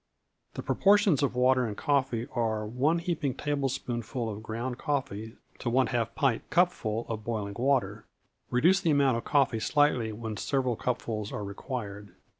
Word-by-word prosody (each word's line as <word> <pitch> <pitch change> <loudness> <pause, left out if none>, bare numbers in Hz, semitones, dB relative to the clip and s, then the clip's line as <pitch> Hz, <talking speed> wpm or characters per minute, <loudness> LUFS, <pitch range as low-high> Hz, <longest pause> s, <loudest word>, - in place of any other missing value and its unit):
The - - -5
proportions 200 -6 +4
of 140 -3 0
water 130 +1 +4
and 105 - -5
coffee 130 -5 +1
are 110 -3 0
one 130 +9 +1
heaping 165 -6 -2
tablespoonful 130 -5 -2
of 105 +1 -7
ground 120 +3 -4
coffee 115 -6 -3 0.2
to 120 - -2
one 130 +2 +3
half 115 -1 -1
pint 135 -5 +2
cupful 120 -11 +1
of 110 -1 -4
boiling 105 -3 -3
water. 120 -5 0 0.4
Reduce 175 +10 +4
the 165 - +1
amount 140 -5 +3
of 115 - -6
coffee 135 -6 +2
slightly 130 -4 +2
when 110 0 -5
several 130 -4 0
cupfuls 110 -3 -3
are 105 - -4
required. 100 -2 -6
125 Hz, 155 wpm, -29 LUFS, 110-140 Hz, 0.4 s, proportions